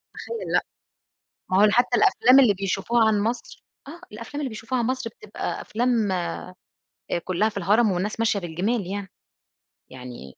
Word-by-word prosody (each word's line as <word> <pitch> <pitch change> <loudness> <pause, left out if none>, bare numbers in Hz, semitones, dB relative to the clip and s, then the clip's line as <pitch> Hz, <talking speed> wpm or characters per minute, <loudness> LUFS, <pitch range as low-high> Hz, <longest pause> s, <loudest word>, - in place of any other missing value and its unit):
أتخيّل 465 -1 -6
لأ، - - +2 0.9
ما 190 +2 +4
هو - - +6
حتى 245 +2 +3
الأفلام 255 +3 +5
اللي 215 -6 +5
بيشوفوها 195 +4 +1
عن 210 -2 +2
مصر 230 +4 -4 0.2
آه، 335 +3 -10
الأفلام 230 +7 -7
اللي 275 - -2
بيشوفوها 235 +3 -3
عن 230 - 0
مصر 255 -3 -2
بتبقى 210 0 -6
أفلام 230 -3 0
آآ 175 -2 -2 0.9
كلّها 190 +4 +1
في 205 - -9
الهرَم، 205 +3 +3
والناس 200 +5 -2
ماشية 220 -3 +2
بالجِمال 185 +4 -2
يعني، 200 0 -4 0.8
يعني 125 - -10
215 Hz, 155 wpm, -24 LUFS, 195-240 Hz, 0.9 s, هو